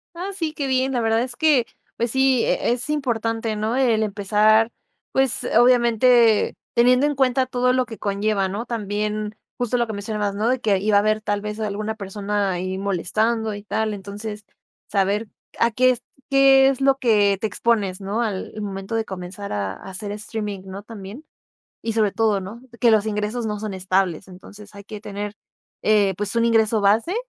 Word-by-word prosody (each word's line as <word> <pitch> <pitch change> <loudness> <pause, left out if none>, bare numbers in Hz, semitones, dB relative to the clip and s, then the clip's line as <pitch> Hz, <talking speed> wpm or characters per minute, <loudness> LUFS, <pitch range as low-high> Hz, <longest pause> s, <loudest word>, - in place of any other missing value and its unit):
Ah, 365 +4 -4
sí, 325 -4 -2
qué 285 -3 -3
bien, 260 0 +1
la 250 - 0
verdad 225 0 +2
es 245 -1 -4
que, 295 -7 +3 0.3
pues 235 0 0
sí 265 -2 +3
eh, - - +1
es 245 +4 -2
importante, 230 -6 -1
¿no? 215 +4 -1
El 235 -5 +2
empezar, 215 +2 +3 0.4
pues, 265 -2 +2
obviamente, 240 -2 +4 0.2
teniendo 250 +3 +4
en 295 0 0
cuenta 260 -1 +2
todo 250 0 +1
lo 255 0 +1
que 225 -2 -9
conlleva, 200 -1 0
¿no? 210 +5 -4
También, 210 -1 -3 0.2
justo 245 0 0
lo 235 -1 0
que 220 - -5
mencionabas, 205 0 -3
¿no? 220 +3 0
De 255 -1 +1
que 200 -4 +1
iba 205 +1 +3
a - - +7
haber 215 +1 +1
tal 205 -1 -1
vez 210 +1 -5
alguna 215 +1 -3
persona 200 0 -2
ahí 185 +1 -3
molestando 215 +4 0
y 205 - -9
tal, 215 +1 -1
entonces 210 +2 -7 0.5
saber 205 +2 0 0.3
a 235 - +3
qué 255 +2 +4
es 245 - -3 0.3
qué 270 -1 +6
es 270 -1 -2
lo 270 0 +4
que, 210 -6 +3
eh, - - -3
te 220 - -2
expones, 205 -3 0
¿no? 205 +4 -2
Al 205 -5 -3
momento 195 +2 -5
de 225 - 0
comenzar 190 +1 -7
a 100 -2 -2
a 195 - -11
hacer 205 +2 -4
streaming, 210 -2 -5
¿no?, 195 +1 -8
también 215 +5 -10 0.6
y 225 - -2
sobre 215 -3 +1
todo 220 -3 +1
¿no? 210 +6 -9 0.2
Que 235 - +5
los 215 -2 +4
ingresos 215 +2 -2
no 210 -1 -3
son 215 -3 -4
estables, 185 -2 0
entonces 205 +3 -13
hay 200 -1 -11
que 210 -1 -9
tener, 205 0 -5 0.5
eh, 205 -3 +3
pues 205 +1 -2
un 230 0 +2
ingreso 225 -1 +3
base, 215 - +2
215 Hz, 190 wpm, -22 LUFS, 205-235 Hz, 0.6 s, a